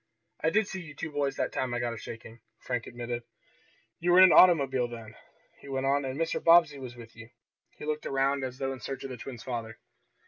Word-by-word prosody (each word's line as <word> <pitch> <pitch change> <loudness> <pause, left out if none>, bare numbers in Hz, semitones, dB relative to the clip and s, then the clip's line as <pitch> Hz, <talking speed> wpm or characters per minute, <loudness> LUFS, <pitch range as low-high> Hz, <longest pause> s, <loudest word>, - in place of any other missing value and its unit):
I 160 - +4
did 210 +4 +2
see 190 - -6
you 150 -4 -11
two 160 +2 -5
boys 145 -2 -1
that - - -1
time 125 -2 -2
I - - -1
got 120 -1 -2
a - - -7
shaking," 115 0 -10 0.2
Frank 125 -2 -4
admitted. 120 0 -5 0.8
"You 175 +1 +1
were 175 - +6
in 185 - +10
an 185 - +7
automobile 135 -8 +5
then," 115 -2 -9 0.5
he - - -14
went 135 0 -2
on, 140 +1 +1
"and 135 +2 -4
Mr. 165 0 -1
Bobbsey 165 -4 +5
was 125 -2 -8
with 115 -1 -13
you." 115 0 -12 0.5
He - - -8
looked 155 0 -3
around 135 0 +1
as 130 -1 -5
though 135 0 -2
in 130 - -9
search 135 +5 -6
of 135 - -6
the 125 - -6
twins' 120 -1 -8
father. 115 -3 -5
135 Hz, 235 wpm, -29 LUFS, 120-150 Hz, 0.8 s, in